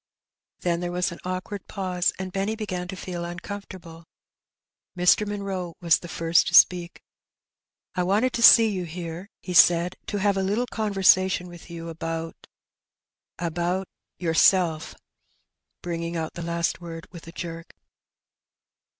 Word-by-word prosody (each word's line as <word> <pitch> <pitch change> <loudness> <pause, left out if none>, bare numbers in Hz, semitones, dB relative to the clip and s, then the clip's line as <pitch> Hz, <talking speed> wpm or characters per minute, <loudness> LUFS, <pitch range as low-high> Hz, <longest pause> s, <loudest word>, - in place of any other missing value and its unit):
Then 170 -1 0
there 175 0 -3
was 180 +1 -1
an 170 - -9
awkward 185 +2 -5
pause, 185 -3 -1
and 185 0 -5
Benny 195 +4 -1
began 185 -5 -4
to 190 - -6
feel 175 -2 -6
uncomfortable. 175 -2 -8 0.9
Mr. 180 +4 +4
Munroe 195 -4 -4
was 170 -2 +3
the 175 - -9
first 165 0 +2
to 175 - +1
speak. 175 -1 +4 0.9
''I 180 - 0
wanted 205 +8 +1
to 235 - -2
see 230 -1 +9
you 190 -4 -2
here," 170 +3 -7
he 180 - -5
said, 175 +1 +5
"to 205 - -2
have 200 0 +1
a - - +1
little 205 +6 0
conversation 190 -5 +2
with 175 0 -13
you 170 -1 -7
about 165 0 -6 0.5
— - - -68
about 175 +3 -2 0.2
— - - -61
yourself," 165 -1 +3 0.9
bringing 170 -1 -3
out 160 -1 -4
the 170 - -7
last 170 +1 -2
word 165 0 -8
with 170 -1 -12
a - - -8
jerk. 165 -1 -8
180 Hz, 150 wpm, -25 LUFS, 170-190 Hz, 0.9 s, see